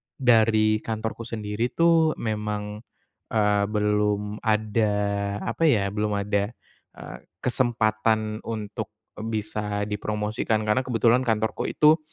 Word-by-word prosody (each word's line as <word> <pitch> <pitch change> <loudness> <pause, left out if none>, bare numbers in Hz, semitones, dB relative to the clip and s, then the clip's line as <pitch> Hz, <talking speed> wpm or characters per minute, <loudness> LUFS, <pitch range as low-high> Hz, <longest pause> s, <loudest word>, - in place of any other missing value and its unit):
dari 110 -3 +4
kantorku 110 +1 -4
sendiri 110 +1 -2
tuh 165 -2 +4
memang, 105 -1 -3 0.6
eee, 105 -1 +3
belum 105 0 0
ada 110 -1 +1 0.5
apa 160 +9 +1
ya, 100 -8 +2
belum 105 0 -1
ada, 100 +2 -1 0.4
eee, - - -9 0.3
kesempatan 110 -3 +1
untuk 110 -1 -4 0.3
bisa 105 -2 -2
dipromosikan 105 +1 -1
karena 105 +4 +2
kebetulan 120 0 +3
kantorku 110 0 0
itu 155 +2 +4
110 Hz, 105 wpm, -25 LUFS, 105-115 Hz, 0.6 s, dari